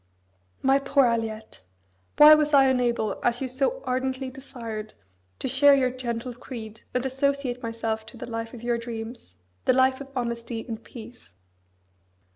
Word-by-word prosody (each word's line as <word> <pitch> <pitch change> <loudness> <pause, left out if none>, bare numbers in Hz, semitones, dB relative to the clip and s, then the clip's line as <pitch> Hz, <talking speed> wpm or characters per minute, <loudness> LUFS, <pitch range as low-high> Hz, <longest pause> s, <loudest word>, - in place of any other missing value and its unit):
My 270 +1 +4
poor 275 0 +3
Aliette! 225 - -2 0.6
why 300 +1 +10
was 300 -1 +3
I 270 -1 +7
unable, 240 -5 +1
as 240 0 +1
you 265 - -2
so 275 - -1
ardently 260 +1 -2
desired, 230 -5 -8 0.4
to - - -3
share 280 +2 +6
your 255 -2 +2
gentle 245 -1 -4
creed, 225 -3 -9
and 250 +1 0
associate 270 -1 -1
myself 225 -1 -3
to 245 - -11
the - - -6
life 230 0 -5
of 235 - -11
your 240 -1 0
dreams, 230 - -7 0.3
the - - +4
life 260 +1 +3
of 275 - -7
honesty 235 -2 -3
and 225 -1 -6
peace? 225 - -13
245 Hz, 155 wpm, -26 LUFS, 230-265 Hz, 0.6 s, why